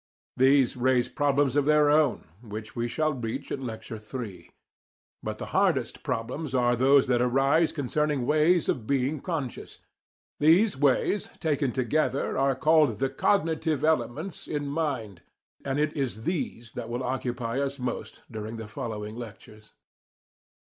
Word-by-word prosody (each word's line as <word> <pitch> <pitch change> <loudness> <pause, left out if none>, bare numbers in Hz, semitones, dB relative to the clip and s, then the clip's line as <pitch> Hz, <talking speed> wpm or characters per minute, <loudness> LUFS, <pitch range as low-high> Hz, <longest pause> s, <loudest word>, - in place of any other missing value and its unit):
These 135 -1 +4
raise 125 -1 +2
problems 145 -2 +1
of 145 -1 +3
their 150 0 +4
own, 150 - +2
which 110 -1 -8
we 120 0 -1
shall 155 +5 0
reach 125 +2 -5
in 135 - -3
Lecture 110 0 -7
III. 105 -6 -7 0.7
But - - -4
the - - -5
hardest - - +1
problems 130 +5 -3
are 120 -1 +3
those 135 +3 +5
that 125 -1 +2
arise 135 +6 +3
concerning 145 -1 -1
ways 155 +4 +3
of 110 -3 -1
being 140 +2 0
"conscious." 150 -6 -5 0.6
These 175 +8 +5
ways, 145 +8 +1
taken 145 -4 0
together, 135 +3 0
are 135 0 +2
called 150 -5 +3
the 135 +2 -1
"cognitive" 160 -2 +1
elements 155 +3 -1
in 145 -1 -2
mind, 140 - -3 0.4
and 135 0 -2
it 150 +1 0
is 125 -6 -3
these 120 -9 -3
that 115 -2 -6
will 120 +2 -3
occupy 125 -1 -2
us 140 0 -2
most 125 -2 -5
during 110 +1 -6
the 110 - -6
following 105 0 -5
lectures. 110 -2 -11
135 Hz, 145 wpm, -27 LUFS, 120-150 Hz, 0.7 s, those